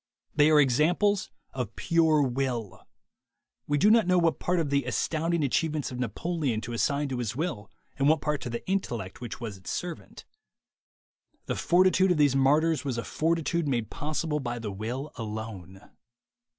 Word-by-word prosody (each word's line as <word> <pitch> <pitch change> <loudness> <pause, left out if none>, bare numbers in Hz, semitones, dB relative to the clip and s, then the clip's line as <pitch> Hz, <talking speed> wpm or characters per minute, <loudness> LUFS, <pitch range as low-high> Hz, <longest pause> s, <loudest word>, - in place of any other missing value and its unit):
They 150 +1 +5
are 155 -1 +6
examples 175 +9 +2 0.2
of 125 -5 -4
pure 160 -3 +3
will. 125 -5 -3 0.8
We 145 - +1
do 205 +8 +5
not 225 -4 +4
know 180 0 +4
what 170 -2 +2
part 180 0 0
of 150 -4 -1
the 140 0 +2
astounding 165 0 0
achieve 150 +3 +1
ments 150 -4 -3
of 125 - -6
Napoleon 130 - -2
to 120 +2 -6
assign 140 +5 0
to 130 -2 -3
his 120 -2 -3
will 150 - -3 0.3
and 140 +1 +4
what 160 0 +4
part 150 -1 -2
to - - -5
the 120 0 -6
intellect 120 - -3
which 120 -3 -6
was 110 -5 -6
its 95 - -10
servant. 175 -2 -6 1.2
The - - -2
fortitude 185 +2 +3
of 180 - +2
these 145 -3 +4
martyrs 150 +4 +3
was 135 -4 -2
a 115 - -2
fortitude 165 0 0
made 120 -5 -1
possible 150 +1 -2
by 120 -3 -4
the 110 -3 -5
will 120 +9 -5
alone. 105 -4 -7
145 Hz, 175 wpm, -28 LUFS, 120-165 Hz, 1.2 s, are